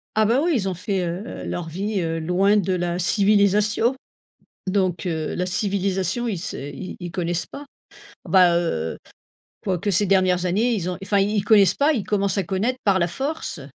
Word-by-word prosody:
Ah 215 0 +3
bah 240 +5 +2
oui, 345 - +1
ils 195 -6 0
ont 185 - -4
fait, 195 +1 -2
heu, 180 +7 -6
leur 175 -2 -4
vie, 195 +4 -2
heu, 165 -1 -2
loin 180 +5 +2
de 190 -2 +1
la 175 0 -2
civilisation. 210 +5 +3 0.7
Donc, 185 -3 0
heu, 160 -3 -2
la 180 - -1
civilisation, 195 +4 -1
ils 205 -6 -2
se 195 +6 -5
ils 145 +6 -7
ils 175 -1 -6
connaissent 175 -1 -2
pas. 290 - -10 0.6
Bah, 180 -3 +5
heu, 80 - -2 0.7
quoique 190 +1 -1
ces 200 +2 +2
dernières 185 -2 +2
années, 220 +7 +1
ils 185 -3 -2
ont 180 - -5
enfin 200 +1 +1
ils 205 +2 0
ils 200 - 0
connaissent 205 -4 +5
pas, 290 +2 +3
ils 220 -7 -2
commencent 200 -2 0
à 195 - +1
connaître 205 +9 -1
par 195 -2 +3
la 170 - +2
force. 270 - -4
190 Hz, 190 wpm, -22 LUFS, 175-210 Hz, 0.7 s, Bah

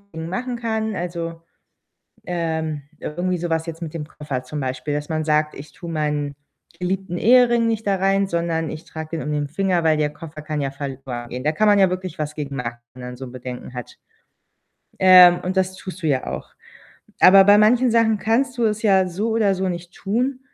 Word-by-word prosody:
machen 190 +10 -4
kann, 220 -2 -2
also, 170 -1 -4 0.8
ähm 160 -4 -2 0.2
irgendwie 180 +4 -2
so 175 0 -3
was 165 0 0
jetzt 165 0 -7
mit 160 -1 -6
dem 155 -2 -4
Koffer 145 -4 -5
zum 150 +4 -6
Beispiel, 130 +2 -3
dass 145 +1 -3
man 155 -1 -1
sagt: 150 0 +1
„Ich 145 +2 -10
tue 170 -1 -8
meinen 150 -2 -2 0.4
geliebten 180 -1 -2
Ehering 240 0 +5
nicht 225 -1 -1
da 200 - +3
rein, 195 +1 +2
sondern 170 -2 -1
ich 155 - -8
trage 160 +1 -6
den - - -4
um 150 - -3
den 145 -1 -1
Finger, 180 +1 0
weil 160 -1 +3
der 150 -1 +1
Koffer 155 0 -10
kann 150 -1 -3
ja 135 - -1
verloren 135 -3 -6
gehen." 125 +1 -6
Da 150 - +2
kann 215 +7 +1
man 205 -1 +5
ja 190 -1 +5
wirklich 185 -1 -5
was 150 0 -3
gegen 140 -2 -5
machen, 120 -1 -4 0.2
wenn 125 0 -11
man 125 0 -7
so 130 +1 -7
Bedenken 125 0 -8
hat. 125 -2 -8 1.0
Ähm, 180 -1 +8
und 185 +1 -2
das 185 0 +1
tust 185 -1 -9
du - - +1
ja 135 -3 0
auch. - - -5 0.7
Aber 195 +1 +8
bei 205 +1 +7
manchen 240 +4 +4
Sachen 225 -2 +3
kannst 240 +5 0
du 235 - +2
es 215 -1 0
ja 190 -3 +4
so 190 +5 -2
oder 215 -3 +2
so 190 0 -1
nicht 175 0 -6
tun. 250 +6 -1
170 Hz, 205 wpm, -22 LUFS, 150-195 Hz, 1.0 s, Ähm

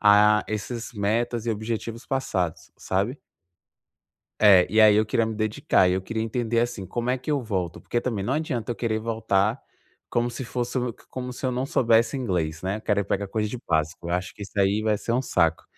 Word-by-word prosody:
a 105 0 +6
esses 115 +2 -4
metas 115 +2 -1
e - - +1
objetivos 115 +2 -4
passados, 95 -11 -2
sabe. 100 +9 -1 1.2
É, 95 -4 +7
e 110 - +4
aí 110 -1 +8
eu 105 +1 +4
queria 110 +2 +1
me 110 - -3
dedicar, 105 -3 +2
e 90 - +2
eu 95 - 0
queria 110 +4 -3
entender 115 0 0
assim, 120 -5 -2
como 120 +5 -2
é 130 - 0
que 130 - -13
eu 145 -3 +1
volto? 95 -7 -3
Porque 120 - -1
também 110 -6 -2
não 125 - 0
adianta 135 -7 -2
eu 120 - -2
querer 110 -2 -1
voltar 110 0 0 0.5
como 120 0 0
se 120 +2 -6
fosse 125 +1 -2
o 120 -2 -2 0.2
como 125 -1 -5
se 125 - -9
eu 130 - +2
não 125 +1 -2
soubesse 115 0 +3
inglês, 85 -11 -2
né, 95 +2 -1
eu - - -7
querer 105 -1 +1
ir - - -2
pegar 100 +1 -1
coisa 105 +2 -1
de 125 - -5
básico, 80 +1 0
eu 85 - 0
acho 90 +1 -3
que 105 - -10
isso 100 - -10
aí 100 +2 +3
vai 110 -1 +1
ser 115 - -6
um 125 - +2
saco. 85 -9 +1
110 Hz, 220 wpm, -25 LUFS, 100-120 Hz, 1.2 s, aí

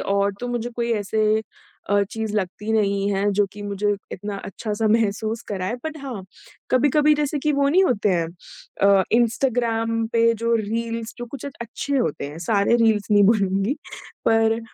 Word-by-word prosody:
और 200 0 +1
तो 245 - -3
मुझे 240 0 -3
कोई 235 0 -1
ऐसे 215 +1 +1 0.5
अ, 205 0 +4
चीज़ 220 -1 -3
लगती 210 +2 -2
नहीं 200 -2 +1
है 200 +1 +1
जो 205 +1 +3
कि 205 - -10
मुझे 205 0 0 0.2
इतना 205 +2 -5
अच्छा-सा 215 +2 -3
महसूस 220 +1 0
कराए 190 +1 -2
बट 315 0 -4
हाँ, 240 -9 -6 0.5
कभी-कभी 290 +4 +4
जैसे 295 0 -1
कि 300 +2 0
वो 280 0 +2
नहीं 375 +6 +4
होते 210 - +1
हैं 170 -2 +1 0.6
अ, 200 -1 +6
इंस्टाग्राम 230 -1 +1
पे 230 0 +4
जो 230 0 +2
रील्स 230 +1 -3
जो 240 - -5
कुछ 265 +3 -9
एक 280 - -5
अच्छे 255 +4 -3
होते 235 - -1
हैं। 150 +2 -9
सारे 210 +2 +3
रील्स 220 -3 +2
नहीं 205 -1 +6
बोलूँगी, 200 +2 +2 0.5
पर 225 0 +3
225 Hz, 170 wpm, -23 LUFS, 205-240 Hz, 0.6 s, अ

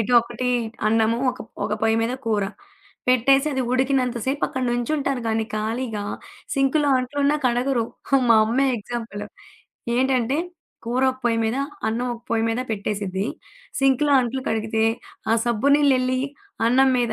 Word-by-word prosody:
ఇటు 220 +3 -1
ఒకటి 240 +2 -4 0.4
అన్నము. 225 +1 +2
ఒక - - -10 0.3
ఒక 210 - -2
పొయ్య 225 0 +3
మీద 235 +2 -1
కూర. 210 -3 +1 0.6
పెట్టేసి 270 +3 +4
అది 265 -1 0
ఉడికినంత 255 -1 +1
సేపు 275 +2 -1
అక్కడ 260 - -4
నుంచుంటారు. 270 +2 -1
గాని 220 0 0
ఖాళీగా, 220 0 -2 0.5
సిం‌కులో 275 +2 +2
అంట్లున్నా 285 +3 +1
కడగరు. 245 0 +1 0.3
హా 275 - +6
మా 230 - +8
అమ్మే 265 +5 +2
ఎగ్జాంపులు. 225 -2 -6 0.7
ఏంటంటే, 260 +1 +1 0.5
కూర 245 +3 0
ఒక 260 - -16
పొయ్యి 230 -1 +2
మీద, 225 +3 0 0.3
అన్నం 230 +3 -1
ఒక 230 - -12
పొయ్యి 225 -1 +1
మీద 225 +2 -1
పెట్టేసిద్ది. 200 -2 -2 0.5
సింక్లో 270 +2 +3
అంట్లు 255 +2 -2
కడిగితే, 220 0 0 0.5
ఆ - - +5
సబ్బు 235 +4 +1
నీల్లేళ్లి 255 -3 +2 0.5
అన్నం 260 +3 +4
మీద 240 -2 +1
245 Hz, 145 wpm, -23 LUFS, 225-265 Hz, 0.7 s, మా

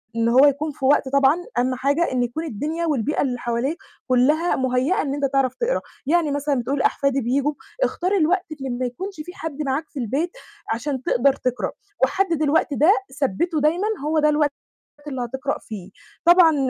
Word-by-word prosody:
إن 230 0 +2
هو 260 +4 +6
يكون 290 +2 +1
في 265 - -5
وقت 275 -1 +3
طبعًا 280 +3 +4 0.2
أهَم 255 +1 +1
حاجة 285 +6 +1
إنه 250 -1 +1
يكون 240 +7 -4
الدنيا 315 +5 -3
والبيئة 290 -1 0
اللي 250 -3 -1
حواليك 240 +8 -1 0.3
كلّها 290 +7 +3
مُهيّأة 260 +9 +1
إن 275 -1 -2
أنت 285 -1 -1
تعرف 265 -2 +1
تقرأ، - - 0 0.2
يعني 320 -1 +2
مثلًا 285 0 0
بتقول 270 +4 -1
أحفادي 275 -1 +1
بييجوا، 275 +5 0 0.3
اختار 365 -6 0
الوقت 355 +3 +2
اللي 270 -3 -5
ما 250 +1 -2
يكونش 380 +11 -5
في 355 +4 -8
حد 310 -2 -5
معاك 285 +2 -2
في 285 - -7
البيت، 280 - -1 0.4
عشان 260 +2 -3
تقدر 270 +3 +3
تقرأ، 255 -2 -2 0.3
وحدد 335 +3 +1
الوقت 300 0 +2
ده 310 +8 +5 0.3
ثبّته 300 - 0
دايمًا 340 +8 +2 0.2
هو 310 +1 +2
ده 300 - +4
الوقت 295 -1 +2 0.6
اللي 265 -3 -3
هتقرأ 265 +3 -3
فيه، 200 -4 -9 0.3
طبعًا 345 -3 +6
280 Hz, 180 wpm, -22 LUFS, 255-315 Hz, 0.6 s, هو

